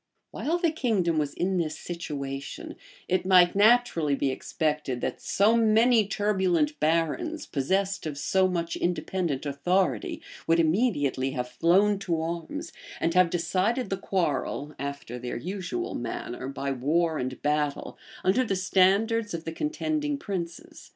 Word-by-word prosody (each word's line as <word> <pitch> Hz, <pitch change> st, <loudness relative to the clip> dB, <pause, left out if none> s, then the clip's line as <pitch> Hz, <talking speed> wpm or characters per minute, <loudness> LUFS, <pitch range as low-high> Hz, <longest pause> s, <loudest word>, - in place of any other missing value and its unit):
While 330 Hz, +4 st, -1 dB
the 345 Hz, -2 st, +1 dB
kingdom 200 Hz, -, +1 dB
was 145 Hz, -2 st, -1 dB
in 185 Hz, +1 st, 0 dB
this 155 Hz, -3 st, -1 dB
situation, 140 Hz, -5 st, -6 dB, 0.3 s
it 185 Hz, -, +1 dB
might 180 Hz, -2 st, +6 dB
naturally 205 Hz, -8 st, +4 dB
be 135 Hz, -1 st, 0 dB
expected 150 Hz, -2 st, -2 dB
that -, -, -3 dB
so 210 Hz, +4 st, +3 dB
many 225 Hz, 0 st, +4 dB
turbulent 185 Hz, -8 st, +1 dB
barons, 165 Hz, -, 0 dB
possessed 190 Hz, +6 st, -1 dB
of 145 Hz, -2 st, -5 dB
so 190 Hz, +5 st, +2 dB
much 170 Hz, -2 st, -2 dB
independent 175 Hz, -4 st, -1 dB
authority, 145 Hz, -, 0 dB, 0.3 s
would 165 Hz, +1 st, +4 dB
immediately 155 Hz, -, +1 dB
have 125 Hz, 0 st, -2 dB
flown 190 Hz, +10 st, +3 dB
to 170 Hz, -4 st, -1 dB
arms, 170 Hz, -, -4 dB, 0.3 s
and 165 Hz, -, 0 dB
have 180 Hz, -1 st, +5 dB
decided 190 Hz, +8 st, 0 dB
the -, -, +2 dB
quarrel, 150 Hz, -6 st, -2 dB
after 140 Hz, -3 st, -5 dB
their 125 Hz, 0 st, -4 dB
usual 195 Hz, -, -4 dB
manner, 120 Hz, +1 st, -5 dB
by 140 Hz, 0 st, -3 dB
war 155 Hz, +5 st, +1 dB
and 130 Hz, 0 st, -4 dB
battle, 150 Hz, -1 st, -1 dB, 0.3 s
under 195 Hz, +8 st, +3 dB
the 200 Hz, -5 st, -1 dB
standards 200 Hz, +3 st, +2 dB
of 165 Hz, -, -7 dB
the 165 Hz, -, -3 dB
contending 300 Hz, -, -2 dB
princes. 180 Hz, -9 st, -6 dB
175 Hz, 140 wpm, -27 LUFS, 150-200 Hz, 0.3 s, might